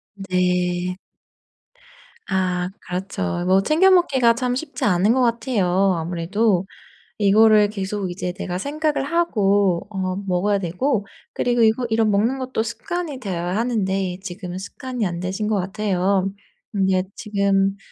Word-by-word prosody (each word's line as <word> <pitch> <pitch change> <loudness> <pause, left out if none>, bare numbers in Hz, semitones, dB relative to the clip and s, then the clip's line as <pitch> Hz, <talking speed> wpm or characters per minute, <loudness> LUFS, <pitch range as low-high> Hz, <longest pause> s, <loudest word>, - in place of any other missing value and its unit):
네. 180 -1 0 1.3
아 180 -1 0 0.2
그렇죠. 180 - -3
뭐 190 +1 +4
챙겨 340 +5 +4
먹기가 265 -11 +4
참 250 0 -1
쉽지 285 -1 -4
않은 200 +3 +3
것 260 - +2
같아요, 200 -6 +2
아무래도. 180 +4 0 0.5
이거를 210 +1 +5
계속 195 -2 -3
이제 180 0 -4
내가 180 -2 -4
생각을 295 +5 -1
하고 205 - +1
어 185 -2 -2
먹어야 195 +3 +1
되고 200 - -1 0.3
그리고 240 -1 +1
이거 225 +3 +3
이런 220 -1 +3
먹는 225 +7 +1
것도 255 -3 -2
습관이 330 - -4
되어야 180 -4 -3
하는데 195 -6 -1
지금은 180 -1 -6
습관이 245 +4 -4
안 170 -1 -3
되신 190 +4 -3
것 215 - +1
같아요. 195 0 0 0.4
근데 190 -2 +1
지금 200 -2 +1
200 Hz, 270 characters per minute, -22 LUFS, 185-230 Hz, 1.3 s, 이거를